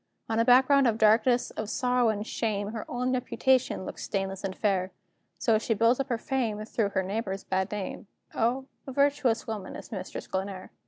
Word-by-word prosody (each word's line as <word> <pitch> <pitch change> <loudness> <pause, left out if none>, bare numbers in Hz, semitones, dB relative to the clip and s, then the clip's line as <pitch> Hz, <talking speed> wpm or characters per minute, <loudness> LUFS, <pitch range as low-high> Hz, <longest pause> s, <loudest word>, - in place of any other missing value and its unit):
On 225 0 0
a - - +5
background 265 +2 +6
of 225 -2 +1
darkness, 230 +3 +4
of 215 -1 -5
sorrow 250 -1 +2
and 210 -1 -2
shame, 205 -3 -2
Her 220 0 -6
own 250 +1 -1
reputation 255 -4 +1
looks - - -7
stainless 195 -1 -3
and 190 -1 -3
fair; 195 -3 0 0.5
So 220 +2 +2
she 225 0 0
builds 230 +4 +3
up 275 0 -2
her 235 - +1
fame, 225 -4 -2
through 220 -2 0
her 190 -1 0
neighbors' 195 0 -3
bad 190 0 -1
name: 205 -1 -5 0.3
O, 250 +4 0 0.2
a - - -4
virtuous 280 -4 +2
woman 215 -4 -5
is - - -10
Mistress 190 -4 -6
Glenare! 190 0 -4
225 Hz, 190 wpm, -28 LUFS, 200-250 Hz, 0.5 s, background